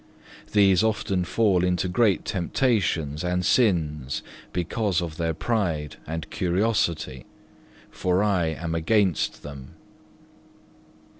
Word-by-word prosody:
These 100 -2 +5
often 100 -4 0
fall 95 -2 +2
into 90 0 +1
great 100 +2 +2
temptations 90 - 0
and 90 0 0
sins 75 - +1 0.3
because 90 +1 0
of 80 -3 -5
their 80 -1 -1
pride 85 -8 -1
and 80 0 -4
curiosity, 90 - 0 0.6
for 90 +2 +1
I 95 -5 +2
am 80 +1 -3
against 90 - +1
them. 70 -3 -10
90 Hz, 100 wpm, -25 LUFS, 80-100 Hz, 0.6 s, These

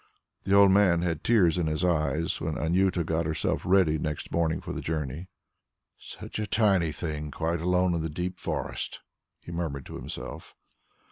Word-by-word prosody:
The 100 - +3
old 100 -1 +7
man 95 -4 +4
had 85 -3 -2
tears 90 -7 +4
in 85 - 0
his 75 +3 0
eyes 80 -2 0
when 80 -1 -2
Anjuta 90 +1 +1
got 80 0 -1
herself 80 - -1
ready 90 -5 +3
next 75 0 -4
morning 80 -1 +1
for - - -6
the - - -4
journey. 80 +2 -3 0.7
"Such - - -8
a 105 - -2
tiny 100 -6 +3
thing, 75 -1 -4
quite 80 +2 -2
alone 90 +1 +2
in 85 - -1
the 80 - -2
deep 90 +4 -4
forest!" - - -4 0.4
he - - -10
murmured 80 -6 -3
to - - -8
himself. - - -8
85 Hz, 175 wpm, -27 LUFS, 80-90 Hz, 0.7 s, old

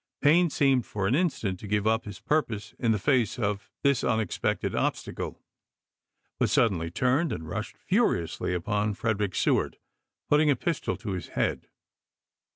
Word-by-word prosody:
Payne 170 +4 +5
seemed 135 -4 +2
for 100 -2 -2
an 100 - +2
instant 135 - 0
to 105 - -8
give 105 0 0
up 110 +1 +2
his 105 -2 -8
purpose 120 -10 -1
in 115 - +2
the 110 - +2
face 120 0 +1
of 100 -3 -2
this 140 -2 +3
unexpected 110 -5 0
obstacle, - - -2 1.0
but - - +2
suddenly 90 -8 +2
turned 130 - +1
and 80 - -5
rushed 105 +6 -5
furiously 180 - 0
upon 105 +4 -1
Frederick 105 -4 -1
Seward, - - +1 0.5
putting 150 +1 +4
a 140 - +4
pistol 165 +6 -2
to 110 -3 -5
his 90 -2 -4
head. - - -1
110 Hz, 155 wpm, -27 LUFS, 100-140 Hz, 1.0 s, Payne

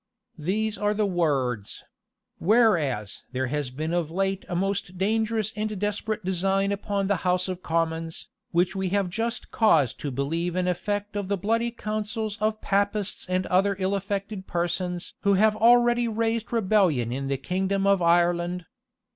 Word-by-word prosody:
These 215 +7 -1
are 210 0 +1
the 210 0 +1
words: 135 - -1 0.6
"Whereas 165 - +2
there 130 +1 0
has 145 0 -2
been 155 +6 -3
of 175 -3 0
late 195 +2 -1
a 175 - -2
most 195 0 -2
dangerous 220 +2 0
and 215 0 -2
desperate 210 0 -2
design 195 +2 +1
upon 200 0 -1
the 200 0 +1
house 180 +1 +1
of 185 -1 -4
commons, 165 -1 -2 0.2
which 175 +3 +1
we 190 -1 -1
have 195 -1 0
just 230 +4 -3
cause 160 - +4
to 145 - -5
believe 165 +7 -2
an 180 0 0
effect 205 +3 -2
of 205 -2 -2
the 200 +1 0
bloody 225 +5 0
counsels 215 -1 -3
of 215 0 0
Papists 205 0 -1
and 185 0 0
other 195 +2 +2
ill 190 0 0
affected 200 0 -3
persons 175 +1 -2
who 200 -1 +3
have 215 +2 +4
already 240 +1 +4
raised 225 0 -1
a - - -1
rebellion 185 - +2
in 135 +2 -3
the 135 0 0
kingdom 190 +6 -1
of 200 -2 +4
Ireland. 175 +1 +2
195 Hz, 165 wpm, -26 LUFS, 175-210 Hz, 0.6 s, cause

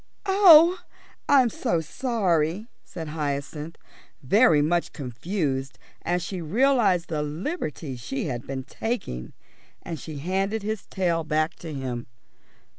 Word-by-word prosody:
"Oh, 370 -3 +7 0.5
I'm 265 -4 +6
so 170 -5 -1
sorry," 185 - 0 0.2
said 160 -3 -7
Hyacinth, 150 +1 -4 0.5
very 200 - +5
much 170 +4 +1
confused 135 - -3 0.2
as 175 0 -1
she 180 0 -5
realised 205 - +2
the 155 -2 -2
liberty 150 - -4
she 125 +3 -4
had 125 -5 -4
been 135 -1 -4
taking, 150 - -4 0.5
and 165 -3 -5
she 155 -2 -7
handed 195 +7 -1
his 215 -2 -4
tail 170 -3 0
back 155 +1 0
to 165 - -8
him. 130 -4 -4
165 Hz, 120 wpm, -25 LUFS, 145-210 Hz, 0.5 s, Oh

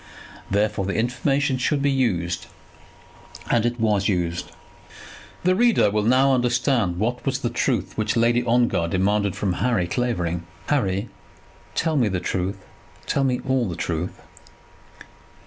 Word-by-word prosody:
Therefore 105 -1 0
the 100 - -2
information 135 +3 0
should 140 +2 0
be 140 - +3
used; 90 -11 0 1.0
and: 120 0 +3
it 120 0 -3
was 105 -3 +2
used. 85 -3 -1 0.9
The 185 +1 +4
reader 225 - +3
will 105 +1 +1
now 130 +3 +4
understand 120 -6 +1
what 120 +5 -1
was 135 -1 0
the 120 - -1
truth 120 -5 -1
which 110 +1 0
Lady 120 +1 +3
Ongar 120 -7 +2
demanded 100 +3 +1
from 95 -3 -1
Harry 115 -8 +2
Clavering. 85 -6 -2 0.2
"Harry, 100 -7 0 0.7
tell 160 -2 +1
me 120 -5 +3
the 95 -3 -1
truth; 95 +2 -2 0.5
tell 140 - 0
me 125 -2 0
all 130 -5 +1
the 85 - -4
truth." 85 +2 -3
115 Hz, 140 wpm, -23 LUFS, 95-130 Hz, 1.0 s, The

